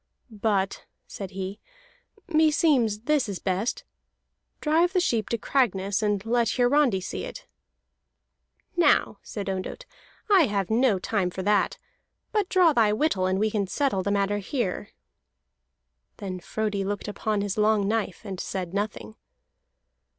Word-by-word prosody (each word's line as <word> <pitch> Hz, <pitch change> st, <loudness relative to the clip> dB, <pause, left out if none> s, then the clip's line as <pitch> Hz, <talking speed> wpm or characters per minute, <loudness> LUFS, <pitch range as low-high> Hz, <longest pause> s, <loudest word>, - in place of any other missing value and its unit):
"But," 205 Hz, -3 st, -1 dB, 0.2 s
said 195 Hz, -2 st, -7 dB
he, 190 Hz, +2 st, -5 dB, 0.7 s
"meseems 300 Hz, -, +3 dB
this 295 Hz, -7 st, +2 dB
is 195 Hz, -, -3 dB
best. 190 Hz, +6 st, -2 dB, 0.8 s
Drive 330 Hz, +4 st, +2 dB
the 370 Hz, -, +3 dB
sheep 235 Hz, -11 st, 0 dB
to 235 Hz, -, 0 dB
Cragness, 200 Hz, -6 st, 0 dB
and 205 Hz, -1 st, 0 dB
let 235 Hz, 0 st, +2 dB
Hiarandi 250 Hz, -4 st, +3 dB
see 185 Hz, -, -5 dB
it." -, -, -8 dB, 1.3 s
"Now," 300 Hz, -, +3 dB
said 205 Hz, -2 st, -6 dB
Ondott, 195 Hz, -, -4 dB, 0.4 s
"I 385 Hz, -8 st, +5 dB
have 200 Hz, -2 st, -1 dB
no 230 Hz, -2 st, +3 dB
time 185 Hz, -1 st, -1 dB
for 185 Hz, +1 st, -5 dB
that. 205 Hz, +1 st, +2 dB, 0.5 s
But 420 Hz, -4 st, 0 dB
draw 360 Hz, -4 st, +5 dB
thy 225 Hz, -5 st, +4 dB
whittle, 210 Hz, -6 st, +1 dB
and 185 Hz, 0 st, +1 dB
we 215 Hz, +2 st, +1 dB
can 205 Hz, -2 st, 0 dB
settle 265 Hz, -3 st, 0 dB
the 200 Hz, -, -2 dB
matter 200 Hz, 0 st, +1 dB
here." 205 Hz, -1 st, -3 dB, 1.3 s
Then 185 Hz, -2 st, -5 dB
Frodi 210 Hz, +1 st, -2 dB
looked 205 Hz, +1 st, -3 dB
upon 210 Hz, 0 st, -1 dB
his 200 Hz, -1 st, -2 dB
long 210 Hz, -1 st, +2 dB
knife, 210 Hz, -4 st, -1 dB
and 190 Hz, -3 st, -5 dB
said 185 Hz, -2 st, -4 dB
nothing. 200 Hz, -, -4 dB
210 Hz, 140 wpm, -26 LUFS, 195-255 Hz, 1.3 s, I